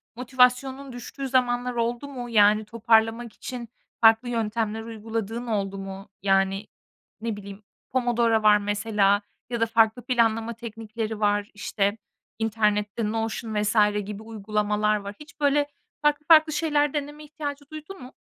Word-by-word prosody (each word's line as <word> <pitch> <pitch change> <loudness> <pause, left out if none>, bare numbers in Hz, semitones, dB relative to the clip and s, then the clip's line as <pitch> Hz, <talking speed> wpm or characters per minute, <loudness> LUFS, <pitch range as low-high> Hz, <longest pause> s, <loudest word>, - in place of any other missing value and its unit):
motivasyonun 255 +2 +1
düştüğü 270 +3 -6
zamanlar 250 -1 +1
oldu 235 +3 -2
mu? 250 -3 -7
Yani 210 -1 +4
toparlamak 225 +1 +2
için 245 -3 -7 0.3
farklı 225 +2 +5
yöntemler 225 -1 -1
uyguladığın 225 +1 -5
oldu 200 -3 -1
mu? 195 +1 -8
Yani, 195 +1 +1 0.5
ne 225 -1 -2
bileyim, 200 0 -10 0.3
Pomodoro 235 -3 +2
var 210 -1 +7
mesela 205 -1 +1 0.3
ya 235 - -2
da - - +5
farklı 225 +1 +3
planlama 230 -2 +1
teknikleri 225 -1 -6
var, 205 -1 +1
işte 205 0 -1 0.4
internette 210 -1 0
Notion 225 0 -3
vs. 210 +2 0 0.3
gibi 210 +1 -7
uygulamalar 210 -1 0
var. 200 0 -7
Hiç 300 +1 -14
böyle 290 0 +2 0.3
farklı 295 0 +1
farklı 315 -1 +7
şeyler 295 -2 +1
deneme 295 +1 -4
ihtiyacı 290 -2 -6
duydun 310 +3 -9
mu? 250 - -12
225 Hz, 135 wpm, -25 LUFS, 210-250 Hz, 0.5 s, var